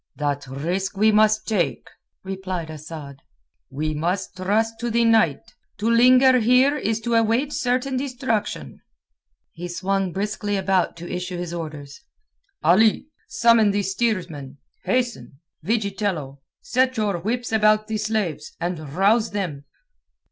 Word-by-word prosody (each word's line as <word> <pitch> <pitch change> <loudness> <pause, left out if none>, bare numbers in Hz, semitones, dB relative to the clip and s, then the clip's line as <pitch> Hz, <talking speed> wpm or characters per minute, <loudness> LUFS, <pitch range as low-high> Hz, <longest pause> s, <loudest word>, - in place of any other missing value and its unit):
"That 145 -2 -2
risk 175 +9 -3
we 215 +2 +4
must 215 0 +3
take," 180 -10 -1 0.4
replied 185 -4 -5
Asad. 150 -2 -9 0.5
"We 155 +3 -2
must 175 +5 -2
trust 220 +5 0
to 240 +1 -2
the 235 +1 +2
night. 220 -11 +2 0.2
To 210 +2 -2
linger 255 +2 +6
here 250 +5 +4
is 225 -6 -1
to 235 +1 -2
await 230 +5 +2
certain 255 0 0
destruction." 245 - -3 0.7
He 175 +1 -7
swung 190 +1 -1
briskly 205 +1 -2
about 190 -3 0
to 170 +1 -8
issue 180 0 -4
his 175 -1 -5
orders. 150 -4 -7 0.6
"Ali, 215 - +4 0.2
summon 230 - +4
the 200 0 0
steersmen. 185 - -2 0.3
Hasten! 235 - -2 0.2
Vigitello, 195 - -2 0.2
set 260 - +1
your 205 -5 0
whips 235 +6 -3
about 215 -1 +3
the 220 0 -3
slaves, 210 -8 -2
and 175 0 -2 0.2
rouse 215 +4 +3
them." 170 -9 -4
200 Hz, 130 wpm, -23 LUFS, 170-225 Hz, 0.7 s, linger